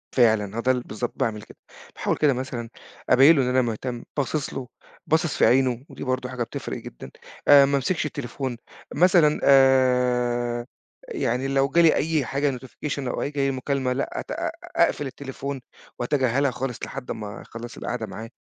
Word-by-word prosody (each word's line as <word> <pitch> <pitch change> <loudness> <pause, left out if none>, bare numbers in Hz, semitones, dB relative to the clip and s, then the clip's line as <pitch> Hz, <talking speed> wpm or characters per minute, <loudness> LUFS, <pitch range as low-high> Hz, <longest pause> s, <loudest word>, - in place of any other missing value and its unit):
فعلًا 110 -4 +3
هو - - -2
ده 130 - +3
اللي 125 -1 -1
بالضبط، 110 +3 -4
باعمل 110 -5 -1
كده. 110 - -15 0.4
باحاول - - -1
كده 150 -3 +3
مثلًا 125 -2 -5 0.4
أبين 135 +6 +7
لّه 140 - +3
إن 125 - 0
أنا 130 +1 +3
مهتم، 120 +1 -3
باصص 140 +1 -1
له، 130 -2 -5 0.4
باصص 160 -1 +1
في - - +5
عينه، 125 0 +2
ودي - - -8
برضه 130 0 -2
حاجة 125 -2 -3
بتفرق 115 - -5
جدًا 65 +2 -10 0.4
آآ 140 -1 +9
ما 140 +1 +1
أمسكش 155 +4 0
التليفون، 130 -3 -4 0.4
مثلًا 170 -2 +4
آآ 125 -3 +3 0.4
يعني 125 +3 -1
لو 135 0 +2
جالي 170 +1 +5
أي 155 -3 0
حاجة 140 0 -1
notification 135 +3 -6
أو - - -2
أي 145 - -2
جاي 140 -1 0
لي 135 - +1
مكالمة 130 -1 -1
لأ 140 - -3
أت - - -7
أ - - -2 0.2
أقفل 145 - +2
التليفون 135 0 -6 0.4
وأتجاهلها 130 +1 +1
خالص 125 -1 -4
لحد 130 -1 -7
أمّا 105 -2 -6
أخلّص 115 +1 -9
القعدة - - -3
معاه، 110 +3 -8
130 Hz, 175 wpm, -24 LUFS, 120-140 Hz, 0.4 s, آآ